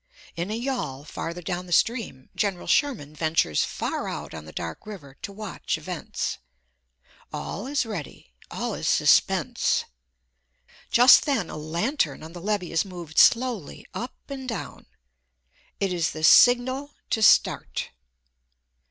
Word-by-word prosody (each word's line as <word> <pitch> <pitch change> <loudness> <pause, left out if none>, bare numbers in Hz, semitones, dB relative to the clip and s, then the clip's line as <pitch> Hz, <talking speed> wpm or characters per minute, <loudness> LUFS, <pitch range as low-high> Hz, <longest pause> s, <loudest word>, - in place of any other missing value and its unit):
In 170 +3 -3
a 215 - -2
yawl, 235 - -3
farther 170 +2 -6
down 180 +1 -4
the - - -11
stream, 195 - 0
General 195 -4 -1
Sherman 235 - +1
ventures 155 - +1
far - - -3
out - - -6
on 80 -1 -8
the 80 - -10
dark 80 - -6
river 150 -11 -10
to - - -6
watch 205 -2 -4
events. - - -4 0.9
All 210 - -5
is 275 -2 0
ready, 175 - -7 0.2
all - - -3
is - - -3
suspense. - - +3 1.0
Just 245 +2 +7
then 260 - 0
a - - -6
lantern 165 - -1
on 160 +1 -10
the 175 - -8
levee 200 -3 -1
is 165 - +2
moved 175 -5 -3
slowly 230 - +3
up 245 +2 -5
and 265 -2 -6
down. 225 -5 -6 0.9
It 195 -2 0
is 165 -2 0
the 155 - -7
signal 255 - +5 0.2
to 220 - +1
start. 215 - +3
190 Hz, 140 wpm, -25 LUFS, 160-240 Hz, 1.0 s, Just